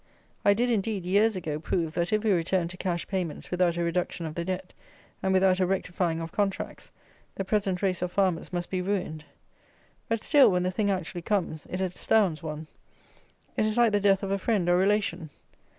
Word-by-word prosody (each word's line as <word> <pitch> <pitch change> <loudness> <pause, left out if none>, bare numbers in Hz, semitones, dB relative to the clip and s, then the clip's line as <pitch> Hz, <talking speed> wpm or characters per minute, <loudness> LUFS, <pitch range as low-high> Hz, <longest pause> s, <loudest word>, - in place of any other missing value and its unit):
I 200 - +5
did, 245 +3 +1
indeed, 210 -3 -1
years 205 +4 +3
ago, 155 -5 -3
prove, 165 0 -1
that 170 +4 -1
if 215 0 +1
we 220 - +3
returned 175 -1 +1
to 185 - -10
cash 175 -2 -2
payments 180 -5 -4
without 180 -1 +2
a 170 - 0
reduction 170 0 -1
of 155 - -5
the 170 - -3
Debt, 185 +1 -4 0.5
and 190 - +1
without 190 0 +4
a 185 - +3
rectifying 180 -3 -1
of 165 0 -5
contracts, 200 -2 -2 0.5
the 195 - -3
present 195 -2 0
race 185 -3 +1
of 180 -1 -2
farmers 185 -3 0
must 175 -1 -3
be 185 -1 0
ruined. 180 -5 -2 0.9
But 230 -1 -1
still, 290 -3 +6
when 180 -2 +1
the 185 - 0
thing 205 +2 0
actually 180 -2 -2
comes, 170 -5 -2
it 185 - -4
astounds 185 -1 +1
one. 155 -1 -5 0.9
It 215 - +2
is 215 +2 -1
like 235 -2 +5
the 205 - +2
death 195 -1 +3
of 195 - -2
a 195 - 0
friend 195 -4 0
or 175 - +5
relation. 185 -4 +1
185 Hz, 200 wpm, -27 LUFS, 175-200 Hz, 0.9 s, still